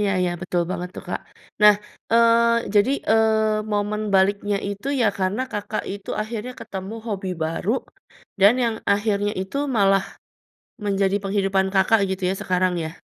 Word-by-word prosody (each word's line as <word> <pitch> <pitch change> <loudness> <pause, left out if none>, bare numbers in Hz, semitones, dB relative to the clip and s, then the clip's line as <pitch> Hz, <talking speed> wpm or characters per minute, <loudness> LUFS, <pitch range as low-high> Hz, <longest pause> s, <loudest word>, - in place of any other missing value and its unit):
Iya 205 -1 +1
iya, 180 -1 +1
betul 175 -1 0
banget 180 -1 -3
tuh, - - -6
Kak. - - -3 0.4
Nah, 210 0 +9 0.4
eee, 235 0 +4
jadi, 205 +6 +4 0.2
eee, 220 -1 +3
momen 210 +1 -1
baliknya 200 +1 +2
itu 205 +5 -6
ya 230 - +4
karena 195 +6 0
Kakak 210 +1 -3
itu 200 -1 -9
akhirnya 230 +3 -5
ketemu 195 +3 -6
hobi 195 -3 -3
baru, 165 +5 -2 0.7
dan 205 +5 +7
yang 230 -1 0 0.2
akhirnya 205 0 0
itu 190 +9 -7 0.2
malah 195 -1 +4 0.8
menjadi 195 -1 +1
penghidupan 195 -1 +1
Kakak 195 +3 +4
gitu 190 0 -4
ya - - 0
sekarang, 185 0 +1
ya? 160 +2 -9
205 Hz, 150 wpm, -23 LUFS, 190-220 Hz, 0.8 s, Nah